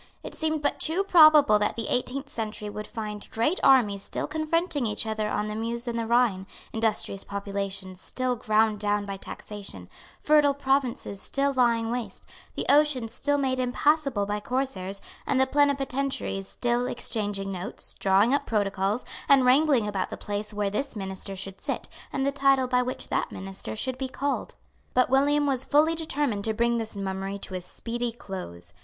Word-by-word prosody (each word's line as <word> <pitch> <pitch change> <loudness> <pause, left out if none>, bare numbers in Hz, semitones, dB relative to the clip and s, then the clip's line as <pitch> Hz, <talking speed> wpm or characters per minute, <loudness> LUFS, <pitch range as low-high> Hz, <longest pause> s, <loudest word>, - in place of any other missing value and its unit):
It - - -7
seemed 315 -1 -1
but 285 - 0
too 340 +5 +1
probable 310 - +7
that 210 - 0
the 230 - -4
eighteenth 265 +3 -1
century 215 -4 -5
would 210 +1 -6
find 210 -3 -6
great 265 +11 0
armies 220 -7 +5
still - - -2
confronting 310 -2 0
each 210 +2 -1
other 215 -1 -2
on 210 0 -1
the 210 - -4
Meuse 235 +2 -3
and 235 -1 -1
the 225 - -2
Rhine, 230 -5 +2 0.3
industrious 220 -3 -1
populations 195 -2 -5
still 255 -1 0
ground 215 -1 +2
down 205 0 0
by 195 -1 -5
taxation, 195 - -8 0.3
fertile 295 -2 +4
provinces 270 -7 0
still 280 0 +1
lying 235 -3 +2
waste, 245 -1 -4 0.3
the - - -2
ocean 285 -5 +4
still 285 +5 +1
made 260 -2 0
impassable 265 -2 +1
by 205 +1 -2
corsairs, 205 -6 -3 0.2
and 270 - +2
the 265 - +5
plenipotentiaries 275 -7 0
still 240 +2 0
exchanging 205 -5 -2
notes, 185 -1 -6
drawing 200 +6 +3
up 285 - 0
protocols, 205 +1 0 0.2
and 270 -2 +6
wrangling 260 -3 +4
about 195 -3 -2
the - - -6
place 205 +1 -4
where 205 -1 -1
this 275 +5 -2
minister 195 -1 -5
should 195 0 -7
sit, - - -3 0.2
and 270 -1 -1
the 280 - +2
title 275 -2 +3
by 250 0 +2
which 250 +1 -4
that - - -1
minister 190 - -6
should 255 - -3
be 265 -1 -2
called. 280 +2 -3 0.4
But 255 0 +3
William 290 +2 +3
was 265 -2 0
fully 305 +4 +4
determined 290 -9 -1
to 220 -1 0
bring 235 +1 +2
this 220 -2 -4
mummery 195 0 -3
to - - -7
a 185 - -3
speedy 235 +6 -4
close. 185 - -8
235 Hz, 175 wpm, -27 LUFS, 205-275 Hz, 0.4 s, probable